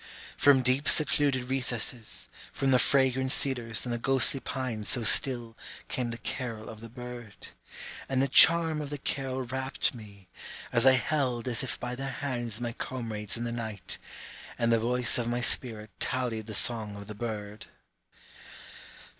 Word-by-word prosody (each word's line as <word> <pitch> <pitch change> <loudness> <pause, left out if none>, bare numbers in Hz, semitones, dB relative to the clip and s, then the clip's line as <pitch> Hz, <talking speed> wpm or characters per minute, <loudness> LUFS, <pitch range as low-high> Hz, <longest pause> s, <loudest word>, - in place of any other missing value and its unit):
From 135 -2 +5
deep 130 +3 +2
secluded 140 -4 +2
recesses, 125 -3 -1 0.2
From 135 -1 0
the 125 - +5
fragrant 130 -1 +2
cedars 120 -6 +1
and 120 - -3
the 120 - -3
ghostly 135 +2 +3
pines 125 -6 -3
so 120 - +1
still, 120 0 +2 0.3
Came 125 -2 -2
the 115 - -5
carol 115 -2 -5
of 110 - -10
the 115 - -9
bird. 120 -5 -9 0.6
And 135 -1 +1
the 135 - +3
charm 160 +2 +6
of 145 - -6
the 145 - -4
carol 135 -1 -3
rapt 130 +2 -2
me, 100 -5 -13 0.5
As 120 +2 +4
I 130 - +8
held 130 -1 0
as 120 -2 0
if 130 - -4
by 125 0 -4
their 135 +2 -4
hands 120 -5 -3
my 120 -1 -3
comrades 115 -4 -3
in 120 - -4
the 120 - -3
night, 110 -5 -5 0.6
And 115 0 +1
the 115 - +4
voice 125 +1 +1
of 120 - -2
my 120 +1 -1
spirit 110 -3 +2
tallied 120 -4 -2
the 110 - -4
song 110 -2 0
of 100 0 -9
the 105 - -8
bird. 105 0 -6
120 Hz, 165 wpm, -29 LUFS, 115-130 Hz, 0.6 s, I